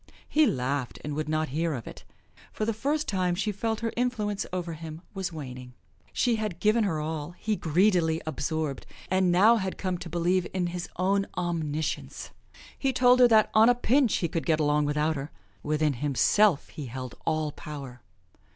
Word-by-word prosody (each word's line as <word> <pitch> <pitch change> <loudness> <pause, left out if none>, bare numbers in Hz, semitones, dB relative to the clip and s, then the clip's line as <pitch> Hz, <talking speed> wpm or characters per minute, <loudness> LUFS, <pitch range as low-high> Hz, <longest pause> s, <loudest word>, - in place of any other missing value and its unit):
He 310 0 +4
laughed 130 0 -2
and 150 - -4
would 155 +1 -3
not 155 -1 0
hear 160 +3 -1
of 120 - -7
it. - - -10 0.5
For 215 - -2
the 230 - 0
first 290 +8 -1
time 185 -3 0
she 210 +3 -1
felt 220 +3 -2
her 230 -1 -2
influence 220 -5 -1
over 175 -2 -3
him 160 +1 -8
was 190 -3 -3
waning. 125 -5 -8 0.4
She 240 -3 +1
had 210 -6 -3
given 215 +1 +3
her 165 -6 -1
all; 155 +2 -4
he 215 -1 -1
greedily 170 -2 +2
absorbed, 155 -1 -3 0.2
and 185 -1 +3
now 210 +7 +6
had 190 -3 -3
come 185 -2 -2
to 170 - -7
believe 175 +2 +1
in 180 -1 +1
his 175 -1 -5
own 195 +2 +1
omniscience. 160 -4 -3 0.5
He 270 - +1
told 250 -1 +5
her 250 - +8
that 220 -2 +4
on 220 +2 +6
a 245 - +5
pinch 250 0 +2
he 170 - 0
could 165 0 -3
get 160 -2 +3
along 150 0 +2
without 150 +2 +1
her 140 +1 -5 0.3
within 150 0 +1
himself 145 - +2
he 145 -4 -7
held 130 0 -6
all 155 -2 0
power. 140 -5 -9
170 Hz, 185 wpm, -27 LUFS, 150-210 Hz, 0.5 s, her